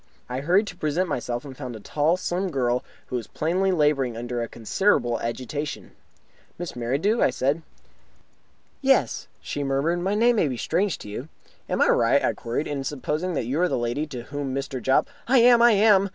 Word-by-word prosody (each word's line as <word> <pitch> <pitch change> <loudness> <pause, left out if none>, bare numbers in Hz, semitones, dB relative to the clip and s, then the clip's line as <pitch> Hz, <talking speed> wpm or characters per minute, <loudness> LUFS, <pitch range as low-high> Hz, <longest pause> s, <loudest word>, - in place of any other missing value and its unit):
I 125 +1 -3
hurried 180 +9 +3
to 190 - -8
present 170 +3 0
myself, 120 -4 -3
and 135 -2 -9
found 125 -3 -6
a - - -8
tall, 150 - +1
slim 185 +1 -2
girl, 125 -5 0 0.2
who 125 - -3
was 115 - -6
plainly 185 +5 0
labouring 145 -8 +1
under 120 0 -3
a 115 - -2
considerable 120 - +1
agitation. 130 +5 -4 0.7
"Miss 175 -1 -6
Merridew?" 140 - 0
I - - +5
said. 140 +5 0 1.2
"Yes," 270 0 +2
she 145 - -4
murmured. 140 +6 0
"My 190 +3 0
name 235 +2 +4
will 155 - +2
be 125 - -3
strange 180 - 0
to - - -11
you." 120 +9 -6 0.4
"Am - - +2
I - - +3
right," - - +3
I - - +1
queried, 120 +6 -3
"in 140 -2 -3
supposing 150 +5 -2
that 130 - -1
you 135 +8 -1
are 180 - +3
the - - 0
lady 120 +6 -1
to 125 -5 -7
whom 140 0 -4
Mr. 135 -2 -4
Jopp 130 +2 +3
" - - -30
"I 265 +2 +4
am! 240 0 +7
I 240 -1 +7
am!" 200 -1 +5
145 Hz, 200 wpm, -25 LUFS, 125-185 Hz, 1.2 s, am